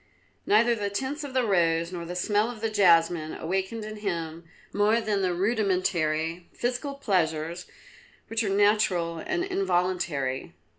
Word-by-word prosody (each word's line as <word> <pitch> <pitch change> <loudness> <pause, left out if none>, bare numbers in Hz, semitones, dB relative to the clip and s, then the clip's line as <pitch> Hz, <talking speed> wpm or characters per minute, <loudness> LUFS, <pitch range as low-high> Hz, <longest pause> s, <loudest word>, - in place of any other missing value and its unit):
Neither 230 +3 +4
the 205 -3 -2
tints 270 +8 -3
of 275 -2 -7
the 255 -2 +3
rose 170 -4 +2
nor 175 -2 -5
the 175 +1 -6
smell 210 +4 +1
of 235 -3 -8
the 225 -1 -1
jasmine 170 -5 +3
awakened 190 +6 -3
in 215 0 -7
him 170 -5 -4 0.3
more 210 +3 +3
than 210 -3 -1
the 185 -1 +1
rudimentary 175 -5 0
physical 250 +4 -2
pleasures 170 - -1 0.6
which 225 0 -1
are 205 - -1
natural 195 -5 +2
and 370 -1 -2
involuntary. 175 - -1
195 Hz, 145 wpm, -27 LUFS, 170-220 Hz, 0.6 s, Neither